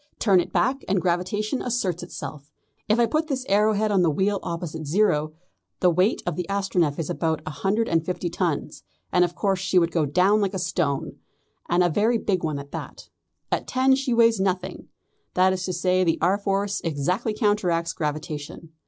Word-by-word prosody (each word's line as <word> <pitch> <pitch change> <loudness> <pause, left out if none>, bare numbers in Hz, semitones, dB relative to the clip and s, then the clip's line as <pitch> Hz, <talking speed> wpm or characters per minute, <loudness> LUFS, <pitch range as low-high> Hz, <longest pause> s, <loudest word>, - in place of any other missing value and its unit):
Turn 195 -4 +4
it - - -2
back, 265 +4 +1
and 190 0 +2
gravitation 185 +7 -1
asserts 200 -8 -1
itself. 150 -4 -8 0.4
If 215 +3 +3
I 235 - +5
put 310 +7 0
this 265 -3 -3
arrow 210 +2 +3
head 215 +1 0
on 195 -2 +3
the 170 - +3
wheel 195 +6 0
opposite 165 -2 -5
zero 155 -3 +1 0.5
the 180 - +4
weight 180 +6 +1
of 175 - -2
the 180 0 -4
Astronef 190 -7 0
is 165 - -3
about 160 -2 -1
a - - -4
hundred 210 +8 0
and 165 -1 +1
fifty 180 +1 -3
tons, 170 -3 -2 0.3
and 180 - +4
of 175 0 -1
course 195 -2 0
she 185 0 0
would 170 -1 +3
go 160 -4 +1
down 190 +8 +3
like 200 -1 -1
a - - 0
stone, 170 -6 -2 0.5
and 175 +1 +3
a - - +4
very 215 +8 +2
big 190 -5 -1
one 155 -3 -1
at 140 0 -9
that. - - -8 0.4
At - - -1
ten 260 +1 +3
she 270 -1 0
weighs 230 -2 +4
nothing; 185 -1 -2 0.5
that 185 +1 +4
is 185 -1 -3
to 185 - -2
say 180 +1 +2
the 165 -2 +1
R. 185 +5 +2
Force 200 0 -1
exactly 180 - -1
counteracts 185 -7 +1
gravitation. 150 +1 -5
185 Hz, 195 wpm, -24 LUFS, 165-205 Hz, 0.5 s, I